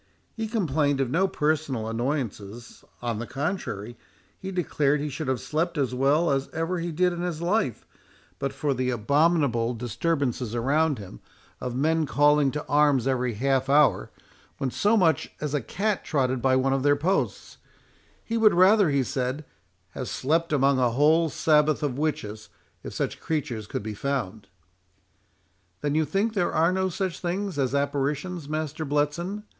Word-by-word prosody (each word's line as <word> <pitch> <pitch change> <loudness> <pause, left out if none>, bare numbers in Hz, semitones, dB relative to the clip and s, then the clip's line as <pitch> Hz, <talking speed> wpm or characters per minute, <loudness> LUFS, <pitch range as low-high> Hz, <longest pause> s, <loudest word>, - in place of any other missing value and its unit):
He 225 -1 -3
complained 155 - 0
of 130 -2 0
no 190 +6 +2
personal 150 -9 -1
annoyances; 115 -3 -4 0.2
on 115 -3 -2
the 120 - -5
contrary, 130 - -4 0.4
he 190 - -6
declared 150 -6 0
he 150 +1 -3
should 150 +1 -5
have 130 -2 0
slept 165 +2 -2
as 135 -3 0
well 140 +6 +2
as 135 0 -1
ever 165 +3 -2
he 170 0 -3
did 180 +3 +1
in 175 - -5
his 175 -3 -3
life 175 - -1 0.5
but 140 -1 -2
for 145 -2 -1
the 130 0 -1
abominable 125 -1 +2
disturbances 125 0 -2
around 145 +5 +1
him, 95 - -10 0.4
of 125 -1 -4
men 160 +3 +1
calling 145 0 +4
to 150 +2 -5
arms 145 -4 +3
every 125 -3 0
half 135 +3 0
hour, 145 +1 +4 0.5
when 130 - -2
so 210 - +2
much 165 -5 +2
as 150 -1 -3
a 145 - +1
cat 200 - -2
trotted 130 -4 0
by 130 +1 +3
one 135 +1 +2
of 135 - 0
their 145 +1 +4
posts—He 190 +6 -4
would 215 -4 +5
rather, 190 +1 +5
he 140 -2 +2
said, 130 +4 -3 0.4
"have 130 - -6
slept 165 +5 0
among 140 -2 +3
a 125 -1 +3
whole 155 +6 +3
sabaoth 150 +1 +2
of 140 -2 -2
witches, 120 -9 -3 0.3
if - - -7
such - - -3
creatures 130 -9 -3
could - - -4
be 110 0 -4
found." 110 -4 -3 1.3
"Then 145 -1 -1
you 155 +1 +2
think 200 +9 0
there 180 -5 0
are 165 +2 +3
no 190 0 0
such 185 0 -3
things 185 -2 -3
as 135 0 0
apparitions, 145 +4 -2
Master 155 0 -3
Bletson?" 150 +8 -1
145 Hz, 165 wpm, -26 LUFS, 130-165 Hz, 1.3 s, would